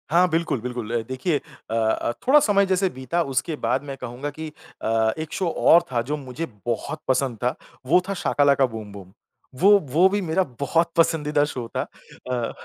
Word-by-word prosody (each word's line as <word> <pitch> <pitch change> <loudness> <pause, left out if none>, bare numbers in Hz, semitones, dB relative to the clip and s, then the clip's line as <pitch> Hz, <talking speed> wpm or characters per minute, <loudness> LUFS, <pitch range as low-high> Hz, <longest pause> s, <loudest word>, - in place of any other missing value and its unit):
हाँ, 175 +3 +4
बिल्कुल, 165 -7 0
बिल्कुल 120 -2 -5
अ, - - -3
देखिए 130 +5 -1 0.3
अ - - -3
अ, 115 +1 +1 0.2
थोड़ा 290 +3 +7
समय 200 -6 +3
जैसे 190 0 +1
बीता 130 +4 -2
उसके 130 +6 0
बाद - - +1
मैं 140 -1 -6
कहूँगा 125 +3 -5
कि 155 +2 -7 0.4
अ, 110 0 +2
एक 155 0 -6
शो 185 - -1
और 170 +1 +5
था 120 -2 +1
जो 145 +6 -3
मुझे 140 +3 -5 0.2
बहुत 120 +6 -3
पसंद 130 -2 +1
था, 125 +1 +1 0.3
वो 175 +7 +4
था - - 0
शाका 160 -5 +1
लाका 140 -1 +4
बूम 110 -4 -7
बूम। 95 -2 -11 0.5
वो, 195 - +6
वो 160 +3 +3
भी 205 +1 0
मेरा 180 +1 +1 0.2
बहुत 165 +4 +1
पसंदीदा 150 -3 +2
शो 125 -5 -5
था - - +1 0.5
अ, 120 -2 -2
145 Hz, 195 wpm, -23 LUFS, 125-170 Hz, 0.5 s, थोड़ा